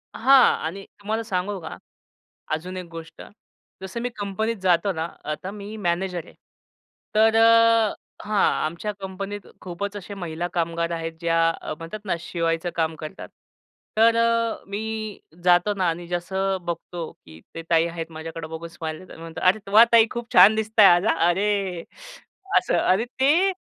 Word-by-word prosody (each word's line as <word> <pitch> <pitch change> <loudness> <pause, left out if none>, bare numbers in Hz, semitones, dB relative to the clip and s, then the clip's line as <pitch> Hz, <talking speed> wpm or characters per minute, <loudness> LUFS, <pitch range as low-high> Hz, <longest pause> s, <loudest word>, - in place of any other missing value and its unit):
हां 265 +1 +6
आणि 195 +4 -5
तुम्हाला 220 +3 -2
सांगू 195 -1 -2
का, 160 -1 -8 0.8
अजून 180 +4 -4
एक 180 - -5
गोष्ट. 165 0 -10 0.6
जसं 190 +5 -5
मी 245 - -2
कंपनीत 210 +3 -2
जातो 185 +1 +2
ना, 160 0 -2 0.2
आता 155 +5 -4
मी 205 +1 -8
मॅनेजर 180 -2 -2
आहे - - -16 0.8
तर 220 +1 +5
अ 230 -1 +5 0.3
हां, 210 -1 +1 0.2
आमच्या 170 +7 -3
कंपनीत 195 +1 -6 0.2
खूपच 195 +3 -5
अशा 200 +1 -8
महिला 175 -2 -4
कामगार 170 0 -1
आहेत 165 -1 -3
ज्या 165 -1 +1 0.2
अ, - - -4
म्हणतात 165 +6 -7
ना 185 - 0
शिवायचं 165 0 -2
काम 160 -1 0
करतात. 155 0 -8 0.7
तर 225 +1 +5
अ, 230 -1 +1
मी 215 +1 -4 0.2
जातो 180 +3 +4
ना 190 -3 0
आणि 170 +1 -5
जसं 190 +3 -1
अ, - - -2
बघतो 170 -1 -5
की 80 0 -16
त्या 165 - -7
ताई 165 -1 +4
आहेत, 165 -1 -5
माझ्याकडं 160 0 -7
बघून 160 +1 -7
स्माईल 160 -1 -6
देतात. 185 - -13
मी - - -13
म्हणतो, 165 -1 -8
"अरे 190 +4 +4
वा! 215 +3 +9
ताई, 230 -1 +7
खूप 235 -1 -6
छान 215 +2 +8
दिसत 220 +1 -2
आज 185 -2 +7
हा," - - +3
अ, - - +4
अरे 195 -1 0 0.7
असं, - - +2
अरे 190 +5 +2
ते 325 +9 +4
190 Hz, 165 wpm, -24 LUFS, 170-215 Hz, 0.8 s, वा